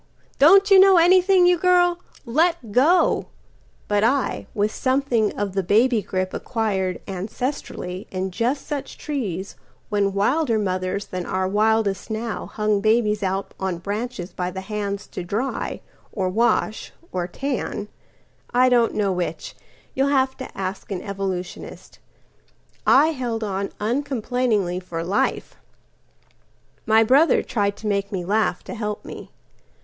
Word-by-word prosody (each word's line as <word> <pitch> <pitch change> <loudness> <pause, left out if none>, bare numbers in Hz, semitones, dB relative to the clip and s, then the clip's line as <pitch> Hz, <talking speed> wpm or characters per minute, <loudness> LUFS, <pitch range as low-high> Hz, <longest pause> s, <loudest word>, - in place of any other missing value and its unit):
Don't 390 +7 +6
you 390 - +9
know 385 -1 +7
anything, 365 +2 +5
you 355 -1 +4
girl? 355 -1 +3 0.3
Let 310 -1 +1
go!"But 250 - 0
I, 265 +4 0
with 210 +1 0
something 260 -5 +1
of 200 -2 -2
the 195 - +1
baby 220 +5 +3
gripAcquired 190 0 -2
ancestrally 195 -1 -5
in 190 0 -3
just 245 +8 -1
such 290 -2 -5
treesWhen 200 - -4
wilder 230 +5 +1
mothers 185 0 -2
than 180 -1 -5
our 185 0 -1
wildest 210 0 +1
nowHung 215 -2 -2
babies 215 -1 +2
out 195 0 -2
on 190 -2 -2
branches 205 +1 -5
by 180 0 -2
the 190 +1 -6
handsTo 200 -2 -4
dry 230 +9 -3 0.3
or 190 -4 -1
wash 220 +1 0 0.2
or 180 -1 -2
tan, 235 -2 -3 0.6
I 255 +1 +4
don't 240 -2 +3
know 200 -2 +1
which,(You'll 180 - -4
have 265 -2 +2
to 260 - -9
ask 190 0 -4
an 185 -2 -3
evolutionist)—I 195 - -3
held 245 -7 -3
on 195 -1 -2
uncomplainingly 235 -5 -1
for 170 -2 -5
life.My 215 +3 -3
brother 275 +8 +4
tried 200 -3 -1
to - - -11
make 200 0 -1
me 185 -3 -3
laugh 210 -2 0
to - - -7
help 210 -3 -4
me. - - -9
215 Hz, 125 wpm, -22 LUFS, 195-260 Hz, 0.6 s, you